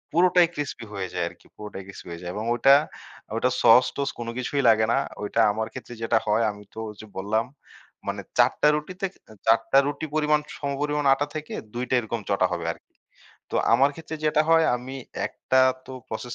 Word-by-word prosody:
পুরোটাই 180 0 +5
ক্রিসপি 145 -5 -4
হয়ে 95 -1 -3
যায় 90 -1 -1
আরকি। - - -20
পুরোটাই 105 -2 -8
ক্রিসপি 100 - -11
হয়ে 85 +1 -7
যায়। 90 - -4
এবং 110 +2 -3
ওটা, 135 +3 +6 0.6
ওটা 125 - +2
সস-টস 125 +4 +5
কোনো 115 0 -4
কিছুই 140 +3 -1
লাগে 110 0 +4
না। - - +3 0.3
ওইটা 105 - -2
আমার 110 +1 -2
ক্ষেত্রে 120 - -8
যেটা 115 0 +2
হয় 110 +2 +3
আমি 105 0 -12
তো - - -18
ওইযে 105 +1 -11
বললাম 110 +4 0 0.6
মানে - - -2 0.2
৪ - - +6
টা 150 - +6
রুটিতে 180 +6 -4 0.4
৪ 115 +1 +6
টা - - +6
রুটি 145 +2 -3
পরিমাণ 150 0 +3 0.2
সমপরিমাণ 145 +1 -1
আটা 140 +2 0
থেকে 155 0 -5 0.2
২ 125 +1 -2
টা - - -1
এরকম 115 0 -3
চটা - - +3
হবে - - -3
আরকি। - - -25 0.6
তো - - -6 0.2
আমার 135 +4 +5
ক্ষেত্রে 160 0 -7
যেটা 155 0 +3
হয় 165 0 +5
আমি 125 +2 -8 0.3
একটা 130 - -1 0.3
তো 130 - -9 0.2
প্রসেস 120 +2 -5
125 Hz, 190 wpm, -25 LUFS, 110-145 Hz, 0.6 s, ওটা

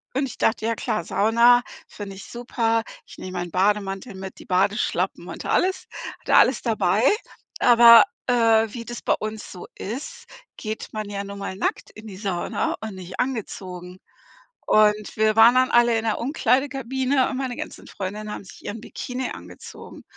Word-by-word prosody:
und 275 - +1
ich - - -10
dachte, 225 -1 +1
ja 230 - +1
klar, 175 - -2
Sauna 235 +6 +4 0.3
finde 200 -2 -8
ich 195 - -10
super. 230 -1 -1 0.2
Ich - - -14
nehme 185 - -7
meinen 175 -1 -5
Bademantel 195 +2 0
mit, 190 0 -8
die - - -12
Badeschlappen 195 +3 0
und - - -8
alles 375 +1 +1 0.4
hatte - - +1
alles - - +5
dabei. - - +1 0.6
Aber, 235 -1 +8 0.2
äh, 225 -2 +4
wie 235 -2 -6
das 240 0 -7
bei - - +2
uns 215 0 -5
so 180 - -9
ist, 465 - -7 0.3
geht 215 0 -5
man 215 -1 -4
ja 200 0 -4
nun 200 0 -8
mal 195 -1 -5
nackt 195 - -3
in 215 +1 -12
die 190 -3 -9
Sauna 190 -4 -2
und 220 -3 -6
nicht 185 0 -9
angezogen. 185 -7 -4 0.7
Und 210 -1 +3
wir 215 0 +3
waren 225 +2 +7
dann 255 0 +3
alle 240 -1 +4
in 225 - -3
der 220 - 0
Umkleidekabine 265 -1 0
und 265 - -4
meine 260 -2 -3
ganzen - - -8
Freundinnen 210 +2 -6
haben - - -7
sich - - -14
ihren 215 +1 -5
Bikini 250 +2 -5
angezogen. - - -11
220 Hz, 175 wpm, -23 LUFS, 200-245 Hz, 0.7 s, Aber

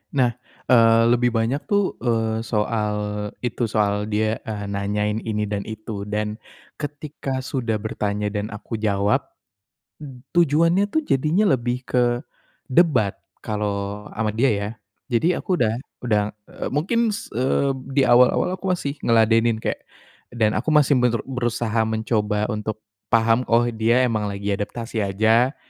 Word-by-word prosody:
Nah, 125 -3 +3 0.4
eee 115 -1 +6
lebih 120 0 +2
banyak 115 +5 +1
tuh, 205 -2 0
eee, 115 -2 0
soal 105 -1 0 0.5
itu, 120 -1 -1
soal 105 -1 0
dia, 110 +1 0
eee, 105 -2 -4
nanyain 105 +1 -1
ini 105 -2 -2
dan 105 0 -3
itu. 110 -2 -6
Dan, 105 +1 -2 0.4
ketika 145 -3 -5
sudah 120 -4 -2
bertanya 105 -1 -2
dan 105 0 -2
aku 105 +2 -6
jawab, 100 -1 +2 0.8
b 135 -4 -10 0.2
tujuannya 170 +5 +3
tuh 315 +2 0
jadinya 155 +10 +2
lebih 125 +1 -3
ke 120 -1 +2 0.5
debat. 130 - +3 0.2
Kalau 105 -1 -3
sama 110 -1 -2
dia 130 +4 +3
ya. 100 0 -1 0.4
Jadi 140 +8 +2
aku 180 0 -1
udah 115 -5 +1 0.2
udah, 105 -4 +2 0.3
eee, - - -5
mungkin 185 +11 +1 0.2
s 225 - -8
eee, 135 +3 +1 0.2
di 140 - +5
awal-awal 125 +9 +4
aku 190 - -5
masih 155 -5 -2
ngeladenin 115 0 +3
kayak - - -1 0.6
dan 110 -2 +2
aku - - -3
masih 145 -3 +4
meru 120 -2 +1
berusaha 120 -3 -1
mencoba 110 -1 0
untuk 110 0 -4 0.2
paham, 115 +2 +3
"Oh, 115 +1 +4
dia 115 +3 +2
emang 110 -4 0
lagi 100 0 -3
adaptasi 110 +3 -3
aja. 110 +7 +2
115 Hz, 140 wpm, -22 LUFS, 105-130 Hz, 0.8 s, eee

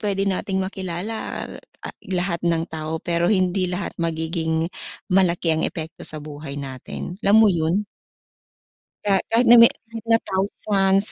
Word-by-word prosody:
pwede 200 -2 0
nating 190 0 -1
makilala, 190 +3 -4
al - - -9 0.2
ah, - - -7
lahat 180 -2 -1
ng 165 -1 +1
tao, 160 0 -3
pero 170 0 +1
hindi 185 -2 +2
lahat 180 +1 -3
magiging 160 0 -1 0.5
malaki 175 -3 +3
ang 160 - 0
epekto 160 0 -7
sa 155 - -6
buhay 145 -1 -7
natin. 140 +6 -6
Alam 200 +1 +5
mo 215 - +6
yun? 170 +5 0 1.2
Kaya, 195 -2 +4
kahit 235 +2 +4
na 240 +1 +9
me 230 - +10
kahit 230 0 -10
na 225 - +6
thousands, 195 +1 +1
180 Hz, 150 wpm, -22 LUFS, 160-195 Hz, 1.2 s, me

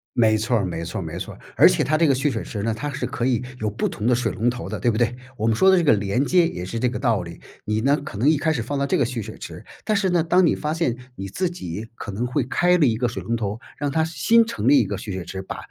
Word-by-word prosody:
没 110 -2 +4
错 110 +3 +1
儿 100 - 0
没 85 -2 -4
错 85 +3 -4
儿 - - -4
没 80 +2 -6
错 - - -6
儿， - - -19 0.2
而 - - +8
且 - - +1
它 155 - +1
这 165 +1 +3
个 135 - +4
蓄 140 +3 0
水 - - -3
池 100 -2 -5
呢， 115 +1 0
它 130 +7 -4
是 140 - -3
可 - - -4
以 125 -2 +1 0.2
有 110 - -1
不 105 - -1
同 110 - -3
的 125 - +4
水 125 - -1
龙 115 +3 0
头 125 0 -5
的， - - -4
对 120 - +2
不 110 - 0
对？ 120 +1 +1 0.2
我 110 - -1
们 115 -1 +2
说 190 +12 +5
的 190 - +6
这 175 - +2
个 150 - +5
连 105 +6 0
接 175 +2 +4
也 90 - -5
是 115 +5 -4
这 125 - +2
个 125 - -4
道 115 -7 +1
理。 85 -1 -9 0.3
你 110 +1 0
呢， 140 +4 +3
可 145 -9 -7
能 120 +7 +1
一 155 - +5
开 160 +2 +1
始 125 -7 -1
放 140 +4 -3
到 140 - 0
这 - - +1
个 135 - +2
蓄 120 -1 -3
水 - - -8
池， - - -9 0.2
但 215 - +1
是 200 -2 +1
呢， 175 -2 +2
当 180 +3 +3
你 - - +2
发 150 0 -2
现 160 -8 -1 0.2
你 95 -3 -6
自 185 - -1
己 105 - -6
可 110 - -7
能 110 +5 -2
会 125 +3 0
开 180 +8 +2
了 160 - +4
一 115 - +2
个 125 +1 +1
水 120 - -5
龙 115 - -2
头， 105 -1 -3 0.2
让 145 -1 -2
它 160 +3 +2
新 230 +8 +3
成 235 - -3
立 285 -1 +7
一 - - +2
个 - - -3
蓄 105 - -6
水 95 -1 -4
池， 95 +3 -6
把 - - -6
120 Hz, 350 characters per minute, -23 LUFS, 110-150 Hz, 0.3 s, 而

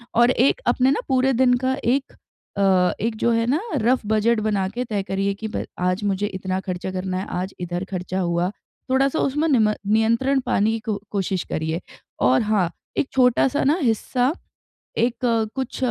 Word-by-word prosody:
और 240 +2 +5
एक 265 - +2
अपने 260 +1 +3
ना 280 - +1
पूरे 265 0 +2
दिन 250 +1 +4
का 260 0 +2
एक 265 +4 +1 0.5
अ, 190 -2 +3
एक 225 +1 -1
जो 235 - +1
है 230 0 +2
ना 290 +7 +1 0.2
रफ 245 +1 +2
बजट 220 +2 +2
बना 200 -3 +1
के 245 +5 -4
तय 210 -4 -2
करिए 195 +1 -1
कि 220 +2 -5
ब - - -2
आज 180 +3 0
मुझे 200 0 0
इतना 185 -2 -3
खर्चा 185 0 -4
करना 185 0 -3
है, 190 - -4
आज 185 +2 -3
इधर 175 0 -3
खर्चा 185 0 -3
हुआ। 175 0 0 0.4
थोड़ा-सा 270 +3 +2
उसमें 295 +4 +1
नी 265 -5 +4
म 215 -1 +3
नियंत्रण 230 +6 +2
पाने 210 +3 +2
की 225 - -2
को 215 -2 -3
कोशिश 190 -3 -1
करिए। 160 +2 -2 0.4
और 130 +1 +4
हाँ, 210 -5 +1 0.3
एक 275 - +1
छोटा-सा 255 +2 +3
ना 290 +5 +3
हिस्सा 245 +3 +1 0.6
एक 235 +1 +2 0.4
कुछ 265 -2 -4
215 Hz, 185 wpm, -22 LUFS, 190-255 Hz, 0.6 s, और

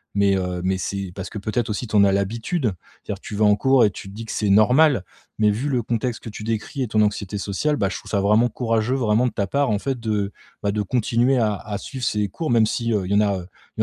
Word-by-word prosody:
mais 100 -1 +3
heu, 90 -1 -3
mais 95 +1 +1
c'est 95 -1 -4
parce 95 0 -6
que 110 - -7
peut-être 110 +3 -2
aussi 110 +3 -3
tu 110 - -4
en 100 - +7
a 100 - +3
l'habitude, 115 - -1 0.3
c’est-à-dire 100 - -5
tu 105 - -7
vas 105 - +3
en 105 0 +5
cours 130 +3 +4
et 105 - +4
tu - - -9
te - - -12
dis 115 +2 -7
que - - -6
c'est 105 -2 0
normal 125 - +5 0.4
mais 105 -1 +4
vu 120 +8 -2
le 125 -4 0
contexte 115 +1 -2
que 115 - -6
tu 105 - -8
décris 115 +5 -3
et 125 - 0
ton 110 0 0
anxiété 105 -1 -1
sociale, 100 +10 -1
bah, 100 -8 0
je - - -4
trouve - - -12
ça 100 - +1
vraiment 105 +4 +3
courageux 115 +1 0
vraiment 120 -1 +2
de - - -2
ta 100 - -1
part 140 +7 0
en 105 - +2
fait 130 +3 -3
de 105 -3 -1 0.3
bah, 100 - +1
de 105 +1 -1
continuer 120 +4 +1
à 110 -3 +2
à 105 +1 -5
suivre 130 +5 -7
ces 105 -3 0
cours 155 - -4
même 115 -2 +4
si 115 +1 -1
heu, 100 -3 0
il 95 - -5
y - - +3
en - - +5
a, 100 -2 +2
heu, 90 - -9 0.3
il - - 0
105 Hz, 280 wpm, -22 LUFS, 100-120 Hz, 0.4 s, en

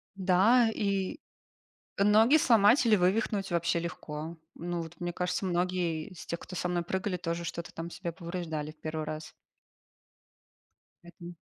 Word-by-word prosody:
Да, 200 +6 +4
и 200 - -1 0.8
ноги 215 +7 +6
сломать 230 -1 +5
или 220 -2 +6
вывихнуть 195 +1 +1
вообще 170 0 +1
легко. 165 -1 -5 0.2
Ну, 175 0 -3
вот, 165 0 -10
мне 175 0 -2
кажется, 180 +2 -2
многие 175 -3 -1
из 185 - -11
тех, 170 - -4
кто 185 - -9
со 180 - -1
мной 175 -1 0
прыгали, 190 +2 -2
тоже 170 -1 -3
что-то 170 0 -5
там 165 +1 -6
себе 170 -1 -5
повреждали 165 -3 -5
в 155 - -32
1 155 0 -3
раз. 155 0 -6 1.7
Один. 175 0 -11
175 Hz, 145 wpm, -30 LUFS, 170-195 Hz, 1.7 s, ноги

